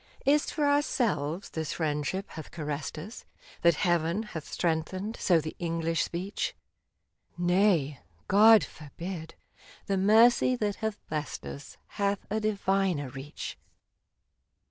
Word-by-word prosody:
Is 290 +2 +4
't - - -4
for 300 - +1
ourselves 220 - 0
this 160 -2 -3
friendship 155 +4 -1
hath 160 - -8
caressed 150 -1 -4
us 200 +10 -8
— - - -27
* - - -22
That 170 -2 +5
Heaven 175 +3 +1
hath 165 -8 -8
strengthened 185 +6 -1
so 175 -3 +4
the 155 0 -5
English 165 -2 0
speech? 185 +4 -3 0.8
Nay; 175 -5 +2 0.3
God 215 +1 +7
forbid! 160 +3 -8 0.5
the 195 - 0
mercy 225 +6 +5
that 210 -4 -1
hath 220 -1 -2
blessed 150 -1 -4
us 140 - -8
Hath 200 -1 -1
a 215 - +1
diviner 195 -8 0
reach 135 +3 -7
180 Hz, 130 wpm, -29 LUFS, 160-210 Hz, 0.8 s, God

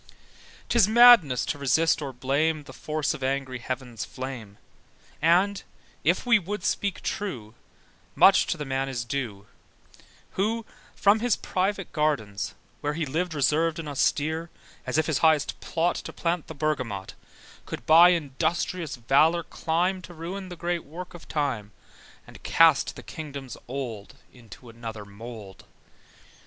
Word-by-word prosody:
'Tis 235 -4 +4
madness 220 - +7
to 145 - -3
resist 155 +5 +2
or 140 -2 -4
blame 145 +5 0
The - - -12
force 155 -1 -2
of 135 - -7
angry 130 -1 -2
heaven's 125 -2 -5
flame: 125 -6 -7 0.6
And, 185 +5 +3 0.4
if - - +2
we 235 -3 +5
would 205 +3 -5
speak 200 -2 -1
true, 125 - -4 0.6
Much 195 - +6
to 175 - -1
the 150 - -5
man 135 0 -1
is 120 -3 -3
due, 115 -6 -4 0.9
Who 220 +3 -1 0.3
from 205 +2 +4
his 240 -1 +2
private 195 +1 -2
gardens, 135 -11 -1 0.2
where 145 0 -2
He 160 -1 -1
lived 165 +5 -2
reservèd 155 +3 +1
and 165 -2 -6
austere, 155 +3 0 0.4
As 130 - 0
if 155 - +3
his 150 -3 0
highest 155 -3 +2
plot 170 +1 0
To - - -7
plant 170 -1 -2
the 160 - -8
bergamot, 130 -11 -2 0.5
Could - - -6
by 165 +3 +8
industrious 165 +1 -1
valour 145 +8 +3
climb 180 +5 -1
To 175 -1 -12
ruin 185 +4 -6
the 175 - -7
great 175 0 -2
work 175 +5 -9
of 175 - -12
time, 125 -9 -2 0.5
And - - -14
cast - - +4
the - - -10
kingdoms 140 -5 -7
old 120 -6 -6 0.2
Into 120 0 -14
another 115 -2 -8
mould. 105 -1 -10
150 Hz, 145 wpm, -26 LUFS, 130-175 Hz, 0.9 s, by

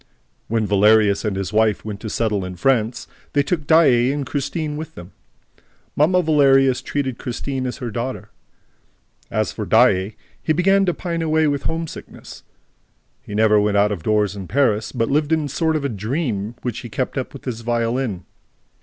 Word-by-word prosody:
When 115 -1 0
Valerius 105 0 +4
and 105 -3 -1
his 95 +1 -4
wife 110 -1 +2
went 105 -2 -5
to 110 - -6
settle 105 -3 -1
in 90 0 -6
France, 115 +2 0 0.3
they 145 - +3
took 155 -2 -2
Daae 135 -6 +5
and 145 -1 -3
Christine 150 +2 -3
with 160 +1 -7
them. 90 +3 -11 0.8
"Mamma" 180 +5 +3
Valerius 135 -4 +4
treated 135 -4 -3
Christine 130 +1 -4
as 125 - -5
her 125 -4 -5
daughter. 120 +4 -5 1.0
As - - -1
for - - -5
Daae, 95 +3 +3 0.3
he 155 - +1
began 195 +3 +3
to 175 - +2
pine 170 -2 -3
away 160 0 +2
with 145 -1 -1
homesickness. 165 0 -6 0.8
He 105 - -8
never 105 0 +4
went 105 0 +1
out 105 +1 +3
of 100 -5 -4
doors 105 +1 +1
in 95 -2 -7
Paris, 110 - +1
but 115 -1 -1
lived 150 +1 +1
in 160 -2 +2
a - - -5
sort 160 +3 0
of 140 -6 -2
dream 110 - -3
which 125 -4 -3
he 120 - -8
kept 125 +4 -3
up 130 -2 -3
with 140 - -12
his 120 -3 -4
violin. 115 -3 -1
125 Hz, 180 wpm, -21 LUFS, 105-145 Hz, 1.0 s, Daae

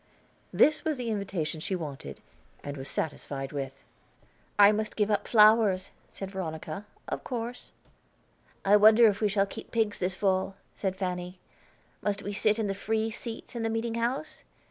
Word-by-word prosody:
This 305 0 +4
was 310 -3 -1
the 240 -2 -2
invitation 185 -7 -2
she 190 +4 -2
wanted, 150 -6 -7 0.4
and 145 0 -5
was 135 -1 -7
satisfied 140 -3 -3
with. 135 -1 -5 0.7
"I 205 0 +8
must 215 0 -2
give 210 0 +1
up 205 - 0
flowers," 210 -4 +5 0.2
said 195 -1 -7
Veronica, 170 +1 -5 0.2
"of - - -4
course." 240 0 -5 0.9
"I 205 +2 +7
wonder 220 +3 +7
if 210 -1 +3
we 210 - +3
shall 195 0 +2
keep - - -9
pigs 220 -3 0
this 180 +1 -1
fall?" 190 0 0 0.2
said 190 -2 -2
Fanny. 180 -1 -4 0.6
"Must 205 -1 -1
we 205 - -4
sit 215 +1 +2
in 220 - 0
the 200 - -1
free 220 +2 -1
seats 230 +2 -7
in 235 - -2
the 225 - 0
meeting 225 +1 -1
house? 240 +6 -2
205 Hz, 165 wpm, -29 LUFS, 185-225 Hz, 0.9 s, I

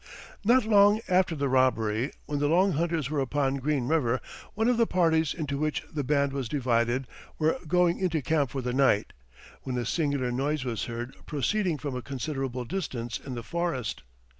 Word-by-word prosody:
Not 240 +3 +4
long 205 0 +5
after 180 -2 +2
the 140 -1 -1
robbery, 125 -2 +2
when 145 -1 -2
the 145 - +2
Long 185 +5 +4
Hunters 160 -3 -1
were 150 - 0
upon 135 0 0
Green 135 -2 -1
River, 130 -5 +2 0.4
one 220 +2 +1
of 245 -1 +3
the 230 -1 +3
parties 160 -3 +2
into 145 -4 -3
which 155 0 -1
the 150 -2 -1
band 140 0 +1
was 135 -4 -3
divided 125 -1 +1 0.3
were 155 0 +1
going 175 +1 +3
into 170 -6 0
camp 145 -1 +1
for 135 +1 -4
the 125 0 -2
night, 130 -6 +2 0.5
when 125 -1 -4
a 120 - -1
singular 140 -2 0
noise 140 +2 -1
was 115 -4 -2
heard 120 +2 -6
proceeding 175 +4 0
from 145 -3 -4
a 125 - -3
considerable 135 -2 -4
distance 120 -8 -4
in 130 -2 -7
the 120 - -5
forest. 170 -7 -2
140 Hz, 185 wpm, -28 LUFS, 125-165 Hz, 0.5 s, long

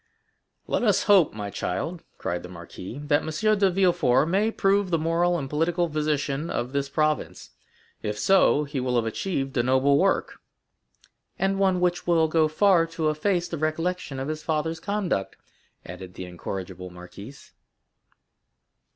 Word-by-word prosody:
"Let - - -1
us 205 -5 +3
hope, 200 -6 +5
my 105 -1 -6
child," 160 - -3
cried 90 0 -3
the 90 - -10
marquis, 90 +5 -9
"that 145 0 +2
M. 210 +7 0
de 195 -1 +4
Villefort 175 -8 +3
may 200 +5 +2
prove 200 -2 +1
the 170 - +2
moral 170 +2 +1
and 140 -4 -4
political 165 +4 0
physician 150 0 -1
of 120 +1 -3
this 140 0 -1
province; 155 +1 -1 0.5
if 105 0 -3
so, 165 - +4
he 145 -1 -4
will 125 -1 -1
have 120 -2 +2
achieved 135 - -3
a - - +4
noble 130 +3 +3
work." 195 +1 +1 1.0
"And 195 0 0
one 190 -2 +2
which 175 -1 0
will 165 -2 +4
go 155 0 +3
far 170 +1 +3
to 165 -2 -1
efface 175 +3 0
the 165 - -5
recollection 155 -2 -2
of 135 - -3
his 155 0 -4
father's 160 +1 -2
conduct," 195 - -2 0.5
added 90 +1 -9
the 95 - -6
incorrigible 90 +1 -6
marquise. 90 +9 -12
155 Hz, 155 wpm, -25 LUFS, 130-180 Hz, 1.0 s, hope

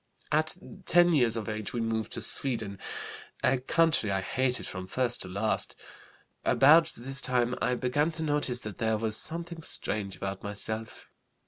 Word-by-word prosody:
"At 155 +3 +2 0.3
10 175 0 +6
years 120 -6 +3
of 110 - -4
age 110 -1 -4
we 120 - -1
moved 115 -1 -1
to - - -2
Sweden, 110 -7 -2 0.6
a 130 0 +3
country 155 -3 +2
I 95 -1 +1
hated 125 +5 -1
from 95 -1 -6
first 120 +3 -1
to - - -6
last. 100 +4 -1 0.7
About 160 +4 +6
this 135 +3 0
time 125 -1 +2
I 125 - +2
began 145 +6 +1
to 160 0 -2
notice 145 -5 -1
that 105 +1 -7
there 110 -2 +1
was 110 0 -1
something 170 +5 -4
strange 100 -9 -3
about 95 0 -4
myself. 110 +2 -5
120 Hz, 160 wpm, -29 LUFS, 110-145 Hz, 0.7 s, 10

